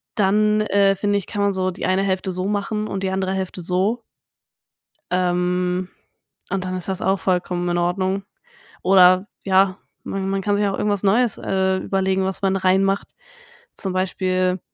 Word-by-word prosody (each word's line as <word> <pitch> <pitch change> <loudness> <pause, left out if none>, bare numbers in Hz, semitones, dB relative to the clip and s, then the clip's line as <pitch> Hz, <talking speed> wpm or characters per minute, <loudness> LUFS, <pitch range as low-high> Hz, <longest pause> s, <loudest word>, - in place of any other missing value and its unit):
dann, 210 +1 +3
äh, 200 -2 +3
finde 205 +1 0
ich, 195 - -11
kann 205 - -3
man 200 0 +2
so 185 0 0
die 180 - -5
eine 185 +1 +1
Hälfte 190 -1 -1
so 185 +1 -3
machen 210 +1 -2
und 195 -2 -4
die 190 - 0
andere 190 0 -1
Hälfte 190 -1 -4
so. 190 +7 0 1.1
Ähm, 180 0 0 0.6
und 190 0 -2
dann 185 0 -3
ist 185 - -4
das 190 0 -2
auch 195 +1 +2
vollkommen 180 -1 -1
in 175 0 0
Ordnung. 185 +3 -1 0.6
Oder 185 0 +5 0.2
ja, 190 -1 +3 0.3
man 195 0 -3
man 195 0 -1
kann 205 +1 +1
sich 205 0 +1
auch 195 -1 -1
irgendwas 205 -2 0
Neues, 220 +3 +3
äh, 190 0 0
überlegen, 190 0 0
was 190 +1 -3
man 195 0 +2
reinmacht. 195 +1 +1 0.7
Zum 190 - -3
Beispiel, 185 0 0
190 Hz, 170 wpm, -21 LUFS, 185-195 Hz, 1.1 s, Oder